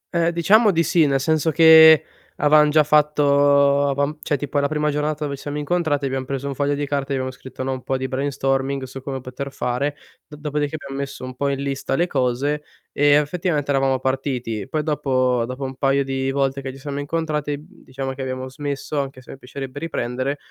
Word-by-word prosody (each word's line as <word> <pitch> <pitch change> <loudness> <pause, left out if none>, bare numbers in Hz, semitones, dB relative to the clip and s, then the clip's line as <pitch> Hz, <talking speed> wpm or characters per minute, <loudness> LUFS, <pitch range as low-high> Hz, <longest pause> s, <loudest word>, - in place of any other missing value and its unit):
Ehm, 170 0 +3
diciamo 200 +7 +4
di 165 -2 +2
sì, 160 0 +3
nel 135 -1 +1
senso 160 +3 +1
che 160 -1 +8 0.3
avevamo 150 +1 +4
già 155 +1 +4
fatto 145 -1 +3
avevamo 140 +2 -1
cioè, 145 - -1
tipo 145 +1 -2
è - - +1
la 140 - +1
prima 150 0 0
giornata 150 +1 -2
dove 140 -1 -3
ci 140 - -13
siamo 145 0 -5
incontrati, 150 -2 0
abbiam 130 0 -2
preso 135 +1 -4
1 140 - -3
foglio 145 +1 0
di 145 0 -2
carta 140 -1 -2
e - - +1
abbiamo 130 -1 -2
scritto, 130 0 -9
no 135 - -2
un 130 -1 -4
po' 135 - -1
di 130 0 -3
brainstorming 135 0 -1
su 130 +1 -8
come 135 0 -5
poter 130 +2 -6
fare, 140 +3 -2 0.3
d 150 - -11
dopodiché 150 0 -3
abbiamo 140 -1 -7
messo 140 -2 -6
un 130 0 -7
po' 140 +2 -1
in 140 0 -2
lista 135 -1 -2
le 170 - +2
cose 140 0 -1 0.3
e 145 - +1
effettivament 150 +1 +2
eravamo 135 -1 +2
partiti. 130 -5 -2
Poi 155 -1 -1
dopo 130 -5 +1
dopo 130 +2 -6
un 135 0 -5
paio 140 0 +2
di 135 0 -2
volte 135 0 0
che 135 0 -5
ci 135 - -12
siamo 140 0 -5
incontrati 150 -1 -2
diciamo 135 0 -7
che 135 - -8
abbiamo 130 0 -4
smesso 145 +1 -4
anche 135 -1 -7
se 125 - -11
piacerebbe 135 +1 -7
riprendere 130 -3 -3
140 Hz, 210 wpm, -21 LUFS, 135-150 Hz, 0.3 s, che